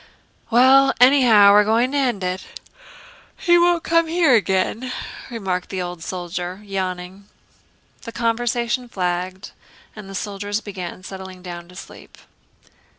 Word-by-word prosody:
"Well, 265 +3 +5
anyhow 245 -6 +6
we're 210 +1 +6
going 230 +4 +1
to 285 - -1
end 240 -8 -1
it. 185 +1 -4 0.9
He 345 -1 +3
won't 345 -1 +2
come 335 0 +2
here 330 -4 +3
again," 215 +4 0 0.4
remarked 190 -6 -4
the 190 - -4
old 175 -1 -5
soldier, 180 +1 -5
yawning. 190 0 -5 0.7
The 230 - -8
conversation 235 +1 -1
flagged, 185 0 -3 0.4
and 210 -3 -10
the 195 - -8
soldiers 205 +1 -3
began 185 -4 -8
settling 190 -1 -9
down 175 -1 -8
to 180 - -15
sleep. 195 - -13
205 Hz, 130 wpm, -21 LUFS, 185-245 Hz, 0.9 s, anyhow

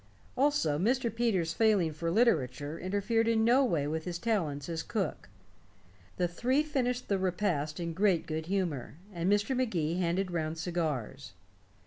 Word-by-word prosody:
Also, 255 - +2
Mr. 235 +4 +1
Peters' 200 -8 0
failing 200 -8 +3
for 165 +2 -3
literature 155 - +1
interfered 205 +4 0
in 225 -1 +3
no 250 +4 +5
way 165 - +1
with 155 +2 -3
his 175 -1 -3
talents 165 -10 -1
as 165 -1 -3
cook. - - -3 0.9
The 180 - +2
three 255 - +1
finished 250 -5 -1
the 200 -2 +1
repast 175 -5 -1
in 170 -1 -3
great 185 -2 +2
good 160 0 -4
humor, 175 -10 -2 0.2
and 175 +2 0
Mr. 205 +6 +2
Magee 180 -10 0
handed 180 +2 0
round 160 -1 -2
cigars. 150 - -3
180 Hz, 150 wpm, -30 LUFS, 160-225 Hz, 0.9 s, no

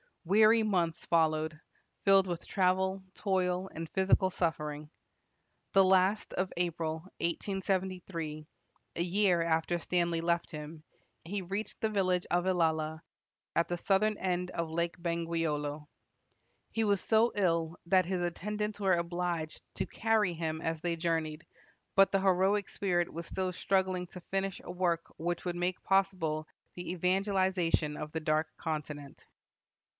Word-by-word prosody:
Weary 215 +5 +6
months 175 -6 0
followed, 155 -1 +1 0.5
filled 195 -1 +6
with 175 -2 -4
travel, 190 0 +1
toil, 185 -1 0
and 165 0 -5
physical 190 0 +3
suffering. 150 -4 -2 0.8
The 195 -1 +7
last 190 +2 +3
of 185 0 -1
April, 165 -2 -1 0.2
1873, 180 -3 -2 0.5
a - - 0
year 180 0 +3
after 165 +1 +1
Stanley 170 -1 0
left 170 0 0
him, 155 0 -8 0.4
he 195 +4 -3
reached 195 +5 -4
the 220 - +2
village 185 -4 +1
of 175 +1 +2
Ilala, 160 -3 +1 0.5
at 170 - +3
the 175 - -2
southern 210 +3 +2
end 180 -1 -1
of 170 -1 -2
Lake 170 +1 -1
Bangweolo. 165 -3 -2 0.8
He 225 - 0
was 200 -3 +2
so 225 +2 +3
ill 170 -4 +1
that 185 0 +4
his 180 0 -1
attendants 210 +4 -3
were 195 -2 +3
obliged 170 -2 -2
to - - -1
carry 220 -5 +1
him 160 -1 -3
as 165 -1 -2
they 175 -1 0
journeyed, 160 -2 -1 0.5
but 195 0 +6
the 195 - +2
heroic 190 +2 +2
spirit 175 -3 0
was 170 +1 -6
still 185 -1 -2
struggling 185 0 +1
to 180 - -10
finish 195 +1 -2
a - - -6
work 175 -2 -1
which 175 +2 -2
would 175 -1 -1
make 180 +1 -1
possible 180 -6 +1 0.3
the 175 -1 -5
evangelization 185 -4 +1
of 150 0 -5
the 160 - -2
Dark 155 0 +1
Continent. 150 -2 -5
175 Hz, 140 wpm, -31 LUFS, 165-190 Hz, 0.8 s, The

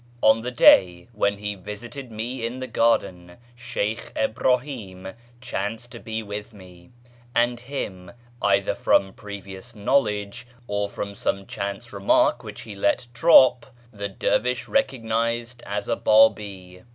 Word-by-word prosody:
On 110 +1 +5
the 120 - -3
day 90 -5 +5
when 100 -3 0
lie 105 0 -3
visited 115 +7 -8
me 115 +3 -5
in 120 +3 -3
the 130 - -4
garden, 95 -7 0 0.2
Sheykh 120 -3 -3
Ibnihi'm 110 -5 -1 0.3
chanced 115 0 -4
to 120 - -9
be 110 0 -5
with 105 +1 -7
me; 90 -3 -15 0.5
and 120 0 +2
him, 100 -9 -6 0.3
either 100 -1 +2
from 95 -1 +2
previous 100 +2 -10
knowledge, 105 -1 0 0.2
or 100 -2 -2
from 100 0 -5
some 100 0 -2
chance 100 +5 -5
remark 100 0 +2
which - - -8
he 105 - -9
let 100 +4 0
drop, 130 -2 +6 0.3
the 100 -1 -4
dervish 125 +5 0
recognised 115 - -1
as 100 0 -3
a - - +1
Biibi. 100 -4 +2
105 Hz, 135 wpm, -24 LUFS, 100-120 Hz, 0.5 s, drop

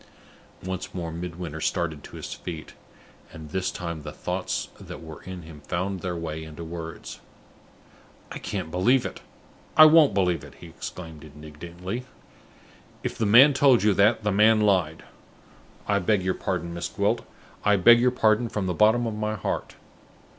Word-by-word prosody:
Once 95 0 -5
more 85 -2 -4
Midwinter 85 -2 -6
started 80 -4 -2
to - - -11
his - - -6
feet; 80 -3 -8 0.6
and 80 -1 -10
this 95 0 -1
time 85 -4 -5
the 75 0 -7
thoughts - - -3
that - - -9
were 80 -1 -10
in 90 -2 -7
him 80 -2 -12
found 95 +2 -2
their 90 -1 -3
way 80 -1 -5
into 80 +1 -9
words. 80 -1 -7 1.1
"I - - -6
can't 80 - -4
believe 120 +9 +3
it; - - -6 0.6
I 155 - +11
won't 155 -7 +6
believe 90 -6 +1
it!" 75 - -13
he - - -13
exclaimed, 80 -1 -9
indignantly. 85 - -8 1.0
"If - - -3
the 110 - 0
man 130 +8 +8
told 135 -4 +4
you 105 -1 +4
that, 100 +3 +3
the 105 - +1
man 110 +2 +5
lied. 90 -6 +1 0.8
I - - +2
beg 95 +1 +1
your 95 0 +1
pardon, 85 -3 -3
Miss 85 0 -3
Gwilt; 105 +3 0 0.4
I 105 0 +4
beg 115 +5 +7
your 125 +1 +4
pardon 115 -1 +2
from 105 -3 -2
the 90 - -1
bottom 110 +6 +4
of 115 - -2
my 105 0 -2
heart. 100 - -4
90 Hz, 170 wpm, -25 LUFS, 80-105 Hz, 1.1 s, I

